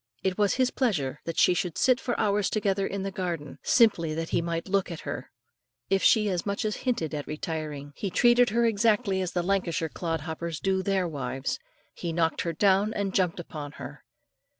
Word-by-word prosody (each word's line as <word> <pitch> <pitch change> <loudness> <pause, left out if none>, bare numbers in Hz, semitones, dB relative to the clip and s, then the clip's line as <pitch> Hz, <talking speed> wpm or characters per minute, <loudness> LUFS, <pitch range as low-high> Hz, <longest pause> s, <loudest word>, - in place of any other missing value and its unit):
It 190 -1 +1
was 205 0 +2
his 255 -1 +2
pleasure 150 - 0
that 165 - -4
she - - +5
should 175 -1 -2
sit 255 -1 +4
for 245 - -2
hours 205 -1 +2
together 200 -2 0
in 195 -1 -4
the 195 - -3
garden, 170 -6 -4
simply 170 -10 +3
that 165 0 -3
he - - +1
might 170 +1 -3
look 195 -1 +1
at 170 -3 -6
her; 140 - -5 0.6
if 195 -1 +3
she 215 -2 +5
as 180 -4 -1
much 200 +2 -2
as 215 - -1
hinted 230 - -1
at 145 -1 -4
retiring, 150 -2 -5
he 200 - -3
treated 240 +5 +5
her 235 +1 +2
exactly 210 -2 +2
as 180 -1 -3
the 175 - 0
Lancashire 175 -4 0
clod 165 -1 -3
hoppers 160 +1 -4
do 190 -1 +1
their 190 -1 +1
wives, 135 -3 -3 0.3
he 170 - -4
knocked 165 -1 +1
her 170 - -2
down 200 +4 +3
and 200 -2 -1
jumped 180 -2 +1
upon 150 -4 -7
her. - - -9
185 Hz, 200 wpm, -27 LUFS, 165-205 Hz, 0.6 s, she